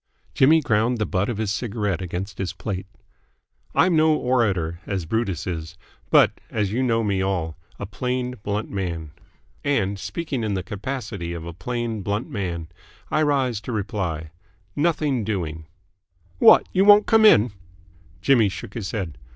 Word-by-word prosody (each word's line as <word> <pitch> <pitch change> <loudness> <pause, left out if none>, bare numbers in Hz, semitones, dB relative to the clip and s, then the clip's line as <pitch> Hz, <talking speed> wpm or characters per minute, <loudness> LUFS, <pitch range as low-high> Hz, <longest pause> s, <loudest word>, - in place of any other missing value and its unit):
Jimmy 155 +4 +5
ground 115 -1 +1
the 110 - 0
butt 100 +2 -1
of 120 - -2
his 110 -2 -1
cigarette 105 -4 -2
against 90 +2 -5
his 90 -4 -2
plate. 95 -1 -5 0.9
"I'm 180 -2 +4
no 155 0 +4
orator, 100 - 0
as 95 -4 -2
Brutus 95 -3 -1
is; 80 -2 -5 0.3
but, - - +4
as 105 -3 -1
you 120 +4 0
know 115 -3 +2
me 100 -3 0
all, 90 -4 -1 0.2
a - - -5
plain, 125 +4 -2
blunt 105 +1 -3
man. 85 -6 -4 0.5
And, 100 -9 0
speaking 145 - -3
in 105 -2 -1
the 95 - -2
capacity 100 -3 -5
of 85 -1 -6
a 85 - -6
plain, 120 +3 -3
blunt 105 +4 -2
man, 85 -6 -4 0.4
I 155 - +2
rise 135 -7 +1
to 125 - -6
reply 95 -7 -3 0.4
Nothing 150 -6 +1
doing." 80 -7 -3 0.7
"What? - - +7
You 190 - +4
won't 205 +1 +7
come 225 -1 +4
in?" 120 - +6 0.7
Jimmy 120 -7 +4
shook 95 - -8
his 105 -5 -4
head. 90 -9 -4
105 Hz, 160 wpm, -23 LUFS, 90-125 Hz, 0.9 s, What